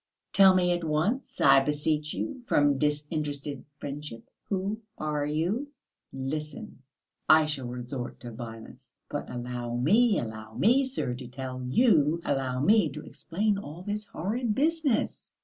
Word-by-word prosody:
Tell 190 -1 +7
me 180 -1 +3
at 175 -1 0
once, 165 - -1
I - - +7
beseech 150 +2 0
you, 275 -4 -4
from 145 - +3
disinterested 150 -2 -2
friendship, 145 -6 -7 0.2
who 200 +2 -1 0.2
are 150 -1 -1
you?" 175 - -1 0.4
"Listen, 140 +1 -5 0.5
I 155 0 +7
shall 140 -5 -3
resort 125 +1 -5
to 120 - -7
violence...." 115 -1 -10
"But - - -4
allow 120 -1 -4
me, 205 - +4
allow 110 -1 -6
me, 255 +6 +4
sir, 255 - -2
to 125 0 -7
tell 130 0 -6
you, 165 - +4
allow 130 -2 0
me 205 +1 +4
to 150 +2 -8
explain 200 +4 -1
all 170 -1 -8
this 210 +1 -3
horrid 215 +7 -2
business." 305 -4 0
150 Hz, 140 wpm, -28 LUFS, 130-200 Hz, 0.5 s, Tell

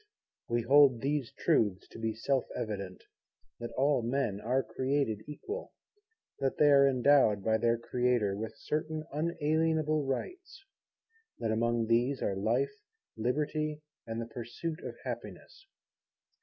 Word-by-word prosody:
We 120 0 0
hold 135 -1 +6
these 140 -3 -1
truths 100 -4 +1
to - - -11
be 115 -1 -2
self 130 +3 0
evident, 100 -4 -5 0.6
that 120 - -5
all 140 0 +3
men 115 -4 -1
are 130 +4 +1
created 130 -1 -1
equal, 410 - -6 0.7
that 135 -1 -1
they 150 -1 +5
are 140 0 +7
endowed 130 -6 +4
by 110 +1 +2
their 115 +1 +2
Creator 120 -4 0
with 110 +2 -6
certain 155 0 -3
unalienable 155 -1 +1
Rights, 370 - -5 0.7
that 115 - -1
among 115 +1 +1
these 120 +4 +2
are 100 - -1
Life, 120 +8 0 0.4
Liberty, 150 +6 -1 0.2
and 115 0 -3
the 115 - -3
pursuit 120 +8 -5
of - - -6
Happiness. 390 - -8
130 Hz, 130 wpm, -31 LUFS, 115-150 Hz, 0.7 s, are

